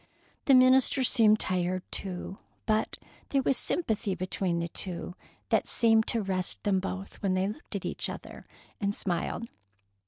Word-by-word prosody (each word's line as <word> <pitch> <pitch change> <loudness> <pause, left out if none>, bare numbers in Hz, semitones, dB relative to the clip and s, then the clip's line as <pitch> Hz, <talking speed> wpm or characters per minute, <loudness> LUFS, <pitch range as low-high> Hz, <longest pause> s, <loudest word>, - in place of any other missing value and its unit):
The 275 - +6
minister 255 +1 +5
seemed 220 -4 +5
tired, 185 0 0
too, 190 0 -5 0.3
but 215 0 0 0.3
there 275 -1 +1
was 270 - +2
sympathy 220 - -1
between 185 -1 -1
the 170 0 -2
two 175 0 -4 0.4
that - - +2
seemed 225 -1 +3
to 230 -2 +1
rest 185 -2 -1
them 195 -2 +2
both 190 +1 -6
when 190 -2 +1
they 185 +1 +1
looked 215 +1 -7
at 200 - -4
each - - -2
other - - -9 0.3
and 200 0 0
smiled. 180 +5 -2
200 Hz, 155 wpm, -29 LUFS, 185-230 Hz, 0.4 s, The